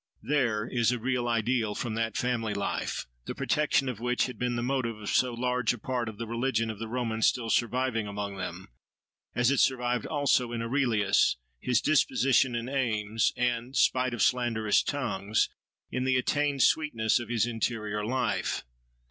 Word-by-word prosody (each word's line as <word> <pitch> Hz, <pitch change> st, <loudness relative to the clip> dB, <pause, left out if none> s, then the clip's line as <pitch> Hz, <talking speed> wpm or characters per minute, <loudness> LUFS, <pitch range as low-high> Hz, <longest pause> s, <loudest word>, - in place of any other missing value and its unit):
— -, -, -35 dB
There, 115 Hz, -7 st, +1 dB
is 120 Hz, -2 st, +1 dB
a 125 Hz, -, 0 dB
real 125 Hz, +1 st, -1 dB
idyll 115 Hz, -2 st, 0 dB
from 120 Hz, -3 st, -3 dB
that 115 Hz, -1 st, -2 dB
family 115 Hz, -4 st, -1 dB
life, 100 Hz, -, -2 dB, 0.2 s
the -, -, -5 dB
protection 150 Hz, -2 st, +1 dB
of 125 Hz, -5 st, -3 dB
which 125 Hz, +1 st, +1 dB
had 125 Hz, -4 st, -7 dB
been 125 Hz, -1 st, 0 dB
the 120 Hz, -, -2 dB
motive 125 Hz, -3 st, -1 dB
of 105 Hz, -, -5 dB
so 125 Hz, -1 st, +3 dB
large 125 Hz, -1 st, 0 dB
a -, -, -7 dB
part 120 Hz, 0 st, -2 dB
of 105 Hz, -, -10 dB
the 115 Hz, -, -4 dB
religion 115 Hz, -1 st, -1 dB
of 105 Hz, -, -10 dB
the 115 Hz, -, -4 dB
Romans, 115 Hz, -2 st, 0 dB
still 115 Hz, -3 st, 0 dB
surviving 120 Hz, -2 st, 0 dB
among 100 Hz, -1 st, -4 dB
them; 95 Hz, 0 st, -6 dB, 0.7 s
as 120 Hz, +1 st, +3 dB
it 140 Hz, -, +2 dB
survived 125 Hz, -3 st, +1 dB
also 140 Hz, -5 st, +1 dB
in 115 Hz, -, -2 dB
Aurelius, 115 Hz, -, +2 dB, 0.2 s
his 120 Hz, -, +1 dB
disposition 135 Hz, -4 st, +3 dB
and 120 Hz, +1 st, -3 dB
aims, 115 Hz, -5 st, 0 dB
and, 125 Hz, +1 st, -1 dB
spite 130 Hz, -1 st, +2 dB
of 110 Hz, -, +1 dB
slanderous 115 Hz, -4 st, +2 dB
tongues, 110 Hz, -7 st, -1 dB, 0.4 s
in 125 Hz, -, -1 dB
the 130 Hz, 0 st, +2 dB
attained 145 Hz, +2 st, +1 dB
sweetness 120 Hz, -8 st, +2 dB
of 120 Hz, -2 st, -7 dB
his 120 Hz, -2 st, +2 dB
interior 110 Hz, -3 st, -2 dB
life. 125 Hz, +2 st, -1 dB
120 Hz, 175 wpm, -28 LUFS, 110-125 Hz, 0.7 s, so